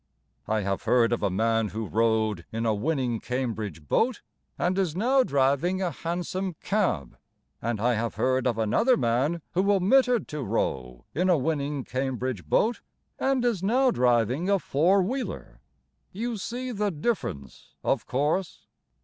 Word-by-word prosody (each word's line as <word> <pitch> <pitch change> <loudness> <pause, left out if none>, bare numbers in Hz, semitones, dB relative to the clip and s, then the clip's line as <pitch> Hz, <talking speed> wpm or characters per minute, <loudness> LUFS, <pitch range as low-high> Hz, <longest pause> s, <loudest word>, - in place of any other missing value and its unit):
I 110 0 +1
have 100 -1 -2
heard 120 -1 +3
of 120 - -1
a - - +1
man 115 +3 +1
Who 110 +3 -4
rowed 110 0 +1
In 115 +1 -2
a 110 - +2
winning 125 0 -1
Cambridge 110 - -4
boat 235 - +1 0.3
And 180 +1 +1
is 175 -5 0
now 255 +8 +3
driving 140 - +1
A 185 -3 -1
hansom 175 +4 -3
cab. 180 - -1 0.4
And 115 -1 -2
I 120 +3 +2
have 115 0 -2
heard 130 0 +1
of 120 -3 0
another 225 - +3
man 140 - 0
Who 195 +3 +2
omitted 240 +4 +3
to 150 -1 -4
row 65 - -2
In 180 +5 +1
a 175 - +5
winning 145 -1 -1
Cambridge 130 - -3
boat 230 - +2 0.4
And 265 -2 +1
is 230 -7 +1
now 250 +6 +3
driving 125 - +2
a 200 - +4
four 180 +4 +2
wheeler. 255 +7 -5 0.5
You 230 +4 -3
see 250 +5 -4
the 210 -2 0
difference, 155 - -4
of - - 0
course! 150 +8 -1
140 Hz, 155 wpm, -26 LUFS, -, 0.5 s, a